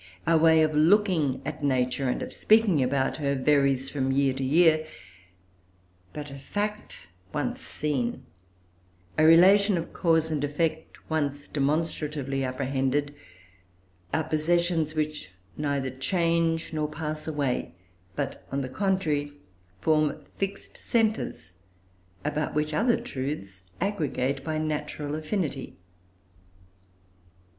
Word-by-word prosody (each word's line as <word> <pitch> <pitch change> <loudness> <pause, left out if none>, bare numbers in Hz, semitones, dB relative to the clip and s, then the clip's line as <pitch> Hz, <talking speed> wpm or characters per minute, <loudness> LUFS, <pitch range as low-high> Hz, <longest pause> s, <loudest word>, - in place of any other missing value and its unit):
Our 165 0 +4
way 160 0 +6
of 155 0 +1
looking 160 -4 +3
at 150 +1 -5
Nature, 130 -1 +1
and - - -1
of - - -7
speaking 215 -8 +4
about 130 +1 +1
her, 140 -2 0
varies 135 -1 +2
from 135 -2 0
year 135 0 +2
to 135 +1 -4
year; 155 +3 +4 1.3
but 150 -1 -7
a 140 - -8
fact 210 +8 -4 0.3
once - - -2
seen, 135 -6 -2 0.9
a 155 - +3
relation 190 +5 +6
of 170 - -5
cause 160 -2 +2
and 150 -2 -1
effect, 155 +2 -2
once 145 -2 -2
demonstratively 145 -2 -1
apprehended, 135 +2 -1 1.0
are 160 - +1
possessions 160 0 +1
which 155 -9 -2 0.3
neither 140 -3 -1
change 165 +4 0
nor 155 -1 -1
pass 155 0 -5
away, 140 - -2 0.4
but, - - -3
on 140 0 -1
the 130 - -4
contrary, 155 -5 0 0.5
form 155 -1 +1
fixed 195 0 -4
centres, 215 - -1 0.7
about 150 0 -1
which 150 0 0
other 230 +9 +2
truths 130 -9 -5 0.2
aggregate 140 -8 -1
by 155 0 -2
natural 150 -1 -3
affinity. 155 -3 -3
150 Hz, 115 wpm, -27 LUFS, 140-165 Hz, 1.3 s, way